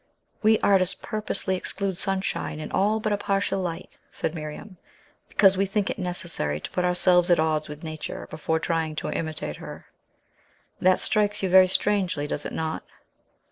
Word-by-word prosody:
"We 220 0 +5
artists 190 -1 +3
purposely 215 -3 0
exclude 195 +1 -2
sunshine, 195 -4 -1
and 155 - -7
all 210 +3 +2
but 215 -1 0
a - - +1
partial 195 -1 0
light," 175 -3 -5
said 160 - -3
Miriam, 160 +5 -7 0.5
"because 195 -2 +5
we 195 +1 +2
think 200 0 0
it - - -6
necessary 170 - -2
to - - -7
put 180 - -1
ourselves 180 0 +3
at 175 - +5
odds 155 -1 0
with 150 +1 -9
Nature 155 -1 -6
before 160 +1 -1
trying 160 -2 -1
to - - -3
imitate 155 - -3
her. - - -9 0.9
That 185 0 +4
strikes 210 -1 +1
you 190 - +1
very 185 0 +8
strangely, 185 -6 +1
does 150 - -3
it - - -8
not? 160 0 -2
180 Hz, 170 wpm, -25 LUFS, 160-195 Hz, 0.9 s, very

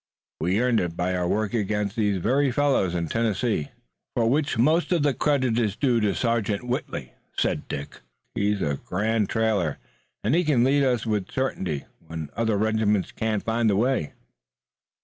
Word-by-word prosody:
We 90 +6 +1
earned 125 -2 +3
it 85 -1 -3
by 90 +1 0
our 90 -1 0
work 105 +2 0
against 105 -2 -1
these 105 -4 +1
very 135 +9 +2
fellows 130 -10 +2
in 85 -1 -1
Tennessee." 110 -5 0 0.5
"For 115 -1 +2
which 140 +1 +1
most 155 +10 +3
of 170 -5 +2
the 145 -2 +3
credit 130 -5 +1
is 105 -4 0
due 125 -3 +2
to 105 -2 +1
Sergeant 115 -4 0
Whitley," 125 0 -4 0.2
said - - 0
Dick. 70 - -6 0.3
"He's 100 -1 0
a 70 -2 -1
grand 105 +2 0
trailer, 105 -9 +1 0.5
and 110 - +1
he 175 +2 +3
can 145 -7 +3
lead 140 +2 +3
us 125 -4 +1
with 105 -4 -1
certainty, 95 - -2 0.2
when 80 -2 -6
other 110 -2 +1
regiments 110 -2 +1
can't 110 -2 -1
find 115 0 +1
the 100 - +2
way." 115 - +1
110 Hz, 170 wpm, -25 LUFS, 100-125 Hz, 0.5 s, earned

